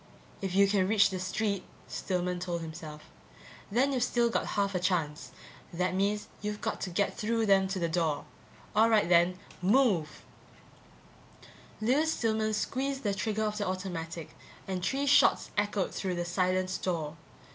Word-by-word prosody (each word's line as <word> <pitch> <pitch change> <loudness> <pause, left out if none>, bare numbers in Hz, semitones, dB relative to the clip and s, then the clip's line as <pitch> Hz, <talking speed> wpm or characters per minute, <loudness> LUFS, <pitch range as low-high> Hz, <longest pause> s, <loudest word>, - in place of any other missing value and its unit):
If 190 -2 -3
you 200 0 +6
can 195 -2 +2
reach 205 -1 +4
the 185 - -3
street, 200 +1 -1 0.2
Stillman 180 -1 -2
told 175 -1 -3
himself, 155 -2 -8 0.7
then 260 +6 +2
you've 255 - 0
still 235 -1 +2
got - - 0
half 200 -1 +1
a 180 - 0
chance. 170 -4 -1 0.4
That 180 +2 -1
means 205 +3 0
you've 210 0 -3
got - - -3
to 190 - -2
get 200 +3 0
through 225 +1 0
them 195 -2 +4
to 195 +1 -3
the 170 -2 0
door. 160 -3 0 0.5
All 220 +2 +5
right 215 -5 +4
then, 175 +1 +4 0.2
move. 190 - +2 1.6
Lewis 290 +8 +2
Stillman 220 -1 0
squeezed 270 +5 -2
the 205 -2 +1
trigger 215 +2 -1
of 210 0 -2
the 205 - -1
automatic 175 -4 -4 0.4
and 185 -2 -3
three 275 +8 0
shots 285 - +4
echoed 205 -2 0
through 185 -2 -2
the 175 0 -2
silent 185 +1 0
store. 165 -5 -2
195 Hz, 160 wpm, -30 LUFS, 180-215 Hz, 1.6 s, you